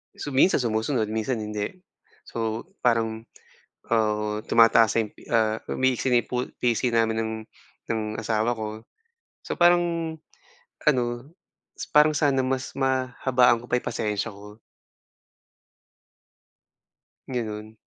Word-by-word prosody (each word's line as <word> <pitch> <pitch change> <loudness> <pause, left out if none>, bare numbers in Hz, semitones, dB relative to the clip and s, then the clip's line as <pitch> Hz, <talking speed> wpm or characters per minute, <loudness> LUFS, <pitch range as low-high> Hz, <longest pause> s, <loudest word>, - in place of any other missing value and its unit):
so 145 - -6
minsan 135 +8 +4
sumusunod, 110 +2 0
minsan 110 +4 -1
hindi. 105 -1 -3 0.6
So 115 -1 -3 0.2
parang, 115 -2 0 0.6
ah, 105 -2 +1
tumataas 115 -1 +5
na - - +4
'yung, 105 - -9 0.2
ah, 110 -1 +2
umiiksi 130 0 0
na 120 -1 +4
'yong - - -25
pu 125 - -1 0.2
pisi 120 +1 +1
namin 115 -1 +2
ng 110 0 -2 0.6
ng 110 -1 0
asawa 115 +1 0
ko, 110 0 -6 0.5
so - - -5
parang 175 -2 +2 0.7
ano, 125 +2 0 0.6
parang 150 0 +5
sana 145 -2 +2
mas 130 0 -2
mahabaan 130 -2 +2
ko 120 - -12
pa 125 - -2
'yong 125 - -5
pasensiya 105 -1 -2
ko. 105 +2 -13 2.7
Ganon. 110 -3 -5
115 Hz, 115 wpm, -25 LUFS, 110-130 Hz, 2.7 s, tumataas